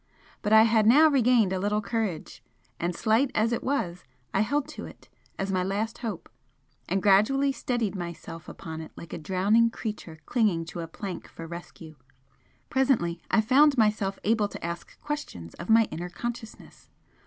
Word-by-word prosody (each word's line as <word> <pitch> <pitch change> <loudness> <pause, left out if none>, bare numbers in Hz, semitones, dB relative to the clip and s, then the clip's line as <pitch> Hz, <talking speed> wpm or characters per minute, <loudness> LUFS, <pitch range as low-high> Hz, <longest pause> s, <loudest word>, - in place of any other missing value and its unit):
But 210 - -2
I 220 0 +8
had 220 -1 +3
now 300 +7 +7
regained 245 -7 +3
a 190 - -1
little 205 +2 0
courage, 210 -4 -3 0.4
and 175 0 -1
slight 225 +7 +2
as 225 +2 +2
it 235 - -2
was 180 -11 -2 0.3
I - - +2
held 285 +6 0
to - - -7
it - - -15 0.3
as 195 0 -2
my 185 -1 +1
last 210 +4 -2
hope, 215 -8 -5 0.6
and 190 +2 0
gradually 215 +8 +4
steadied 240 -5 -2
myself 170 -2 -7
upon 160 -1 -7
it 160 - -10
like 170 - -10
a - - -4
drowning 195 +8 +3
creature 210 -8 -6
clinging 205 -9 +1
to - - -5
a 165 - -4
plank 190 +3 -7
for 165 - -10
rescue. 170 -2 -10 0.7
Presently 225 -11 +1
I 225 - +4
found 275 +5 +5
myself 210 -3 +2
able 215 -1 +2
to 200 - -8
ask 170 0 -7
questions 290 - -5
of 170 - -7
my 225 0 +6
inner 175 +2 -5
consciousness. 235 +3 -8
210 Hz, 170 wpm, -27 LUFS, 175-230 Hz, 0.7 s, I